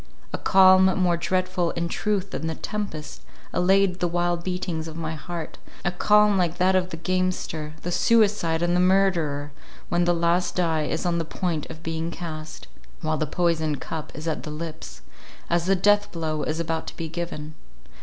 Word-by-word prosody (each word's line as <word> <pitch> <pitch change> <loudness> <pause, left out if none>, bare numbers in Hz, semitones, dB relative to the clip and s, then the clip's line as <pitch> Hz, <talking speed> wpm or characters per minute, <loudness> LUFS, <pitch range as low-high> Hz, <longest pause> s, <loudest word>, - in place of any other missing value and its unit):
A - - 0
calm, 190 0 +6
more 180 -2 +3
dreadful 185 0 0
in 170 0 -2
truth 200 +2 -1
than 160 - -3
the 160 - -2
tempest, 180 -8 -5 0.3
allayed 185 +1 +3
the 175 - +1
wild 175 0 0
beatings 180 -3 -3
of 160 - -8
my 160 -1 -3
heart—a 170 +1 -6
calm 210 +2 +4
like 175 -1 0
that 185 +1 +3
of 185 -1 +1
the 165 - -6
gamester, 175 -3 -2
the 175 - -2
suicide, 180 -3 +3
and 175 0 +2
the - - +3
murderer, 175 -6 +2 0.4
when 175 0 +2
the 175 0 +3
last 170 +1 +1
die 160 -4 +1
is - - -2
on 170 -1 +1
the - - 0
point 165 -1 -3
of 160 - -10
being 165 0 -2
cast—while 155 - -6
the 155 - 0
poisoned 160 -3 0
cup 160 -2 -6
is 155 +2 -6
at 160 - -1
the - - -7
lips,—as 165 +2 -6
the 195 - +4
death 205 +2 +3
blow 155 -2 -2
is 155 +1 -2
about 165 -1 -2
to - - -8
be 165 - -3
given. 160 -2 -5
170 Hz, 175 wpm, -25 LUFS, 160-185 Hz, 0.4 s, calm